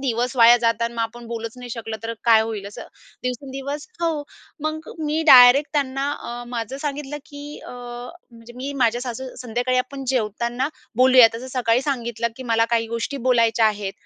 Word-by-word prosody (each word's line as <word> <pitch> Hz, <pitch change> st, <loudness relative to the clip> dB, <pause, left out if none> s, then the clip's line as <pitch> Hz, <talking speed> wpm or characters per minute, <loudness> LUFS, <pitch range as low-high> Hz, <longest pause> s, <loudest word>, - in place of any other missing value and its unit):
दिवस 245 Hz, +1 st, -1 dB
वाया 235 Hz, +1 st, +8 dB
जात 230 Hz, 0 st, +4 dB
आहे -, -, +2 dB
अन् -, -, -13 dB
मग -, -, -1 dB
आपण 235 Hz, +1 st, -6 dB
बोलूच 230 Hz, -1 st, -5 dB
नाही 245 Hz, -1 st, -9 dB
शकलो 225 Hz, -1 st, -5 dB
तर 230 Hz, 0 st, -3 dB
काय 225 Hz, -2 st, +6 dB
होईल? 215 Hz, -3 st, -5 dB
असं. 205 Hz, -, -9 dB, 0.4 s
दिवसेंदिवस 275 Hz, -, -5 dB
हो, 330 Hz, -1 st, +2 dB, 0.5 s
मग 315 Hz, +1 st, -3 dB, 0.2 s
मी 310 Hz, +2 st, 0 dB
डायरेक्ट 255 Hz, +3 st, +8 dB
त्यांना 275 Hz, 0 st, 0 dB
अ, 240 Hz, 0 st, -6 dB
माझं 240 Hz, +2 st, -4 dB
सांगितलं 295 Hz, 0 st, -4 dB
की 285 Hz, 0 st, -9 dB, 0.2 s
अ, -, -, -8 dB
म्हणजे 240 Hz, 0 st, -10 dB
मी 270 Hz, +3 st, -5 dB
माझ्या 235 Hz, +1 st, +1 dB
सासू 255 Hz, +1 st, -6 dB
संध्याकाळी 245 Hz, +2 st, 0 dB
आपण 270 Hz, +1 st, -4 dB
जेवताना 235 Hz, +4 st, -1 dB, 0.3 s
बोलूया 255 Hz, -2 st, +7 dB
तसं 245 Hz, +3 st, -6 dB
सकाळी 235 Hz, +1 st, +2 dB
सांगितलं, 235 Hz, -3 st, -2 dB
की 260 Hz, -, -7 dB
"मला 225 Hz, 0 st, +4 dB
काही 225 Hz, 0 st, +1 dB
गोष्टी 235 Hz, +4 st, -3 dB
बोलायच्या 230 Hz, -2 st, +4 dB
आहेत." 205 Hz, -2 st, -2 dB
245 Hz, 180 wpm, -22 LUFS, 230-265 Hz, 0.5 s, वाया